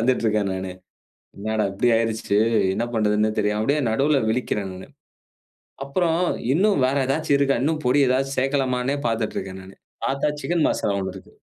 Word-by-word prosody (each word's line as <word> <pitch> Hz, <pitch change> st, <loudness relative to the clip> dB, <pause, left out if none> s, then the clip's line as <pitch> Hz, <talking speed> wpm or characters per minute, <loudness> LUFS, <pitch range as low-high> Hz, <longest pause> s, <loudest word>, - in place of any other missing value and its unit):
வந்துகிட்டு 125 Hz, +1 st, +1 dB
இருக்கேன் 105 Hz, -2 st, +1 dB
நானு. 95 Hz, 0 st, -4 dB, 0.7 s
"என்னடா 110 Hz, +1 st, -1 dB
இப்டி 100 Hz, +5 st, +1 dB
ஆயுடுச்சு, 110 Hz, -3 st, 0 dB, 0.4 s
என்ன 115 Hz, -, -1 dB
பண்றதுன்னே 105 Hz, 0 st, +2 dB
தெரியாம" 105 Hz, 0 st, 0 dB
அப்டியே 145 Hz, +4 st, +1 dB
நடுவில 140 Hz, +5 st, +2 dB
விழிக்கிறேன் 105 Hz, -4 st, -2 dB
நானு. 95 Hz, +1 st, -10 dB, 1.0 s
அப்புறம் 165 Hz, +3 st, +1 dB, 0.3 s
"இன்னும் 195 Hz, -3 st, +3 dB
வேறு 135 Hz, +1 st, +1 dB
ஏதாச்சு 145 Hz, +3 st, 0 dB
இருக்கா? 140 Hz, -3 st, +2 dB
இன்னும் 155 Hz, +1 st, 0 dB
பொடி 130 Hz, +4 st, +4 dB
ஏதாச்சு 135 Hz, +2 st, 0 dB
சேர்க்கலாமானு" 135 Hz, -1 st, 0 dB
பார்த்திட்டிருக்கேன் 105 Hz, -4 st, -3 dB
நானு. 95 Hz, +1 st, -14 dB, 0.3 s
பார்த்தா, 140 Hz, +2 st, 0 dB
சிக்கன் 170 Hz, -2 st, +1 dB
மசாலா 100 Hz, -, -1 dB
ஒண்ணு 95 Hz, -, -3 dB
இருக்கு. -, -, -14 dB
125 Hz, 150 wpm, -23 LUFS, 105-140 Hz, 1.0 s, பொடி